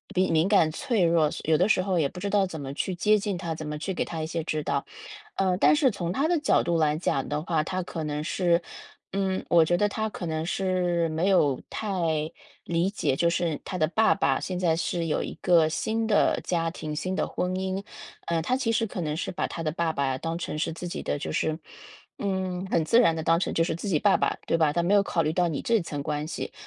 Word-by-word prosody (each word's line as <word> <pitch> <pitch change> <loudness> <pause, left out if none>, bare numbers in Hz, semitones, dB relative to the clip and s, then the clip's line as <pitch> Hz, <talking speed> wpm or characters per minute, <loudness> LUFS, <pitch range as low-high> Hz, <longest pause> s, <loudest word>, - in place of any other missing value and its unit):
敏 185 -1 +2
敏 160 +2 +3
感 195 -6 +4
脆 230 - 0
弱， 165 -2 +3 0.2
有 160 0 +3
的 185 +6 +2
时 185 - +4
候 185 -2 0
也 140 -3 +1
不 180 - -9
知 200 - -2
道 200 -1 +3
怎 165 -5 -6
么 135 -1 -5
去 180 +5 -2
接 210 +4 +3
近 200 -2 -2
她， 170 -3 -4
怎 155 -1 -7
么 150 0 -4
去 160 +5 -3
给 - - -1
她 165 -2 -5
一 155 - -3
些 165 0 -3
指 155 -2 -2
导。 140 -1 -1 0.5
呃， 190 -2 +1
但 - - +5
是 295 -3 +4
从 175 -6 -3
她 275 - +1
的 345 0 +2
角 290 - +3
度 170 -1 +1
来 155 -1 +2
讲 140 -5 -1
的 150 +1 -2
话， 160 -3 0
她 185 +3 -3
可 165 -2 -5
能 150 0 -3
是， 170 +1 +1 0.5
嗯， 190 -1 -1
我 165 -2 +6
觉 175 - +2
得 205 +3 +2
她 220 +1 -2
可 185 - -6
能 160 0 -2
是 180 -2 0
没 160 +4 0
有 150 -9 +3
太 200 -4 -3 0.7
理 170 +2 +1
解， 170 -9 0
就 170 +4 +2
是 170 -3 -1
她 190 - -5
的 155 - +3
爸 220 +6 +3
爸 - - +1
现 185 -1 -4
在 170 -3 +2
是 170 0 -2
有 155 - 0
一 - - -5
个 165 -3 +5
新 220 +8 -1
的 210 -2 +3
家 165 -2 0
庭、 155 -2 -6
新 185 +4 -2
的 - - 0
婚 180 - -2
姻， 190 +1 -2 0.4
呃， 165 -1 +1
她 255 - +1
其 250 -4 0
实 225 0 +1
可 195 -4 -5
能 155 -1 -2
是 - - -3
把 - - -2
她 165 - -6
的 155 - 0
爸 165 +1 0
爸 135 -3 -1
当 165 +2 -3
成 155 -3 -4
是 160 - -1
自 175 +2 -6
己 - - -5
的， 70 - -2
就 80 - -4
是， 155 - 0 0.6
嗯， 190 -1 -2
很 160 - +1
自 230 +9 +5
然 165 -9 +4
地 160 - -3
当 165 +1 +3
成 - - -1
就 165 - +3
是 165 - -1
自 185 +5 -6
己 170 - +3
爸 200 +5 +4
爸， - - 0
对 - - +1
吧， 155 -2 +3
她 170 +3 0
没 185 +4 +2
有 205 - +6
考 180 -4 0
虑 155 - 0
到 175 0 +2
你 160 -4 -2
这 230 -3 +2
层 145 -4 -5
关 150 0 -2
系。 - - -5
170 Hz, 275 characters per minute, -26 LUFS, 160-190 Hz, 0.7 s, 我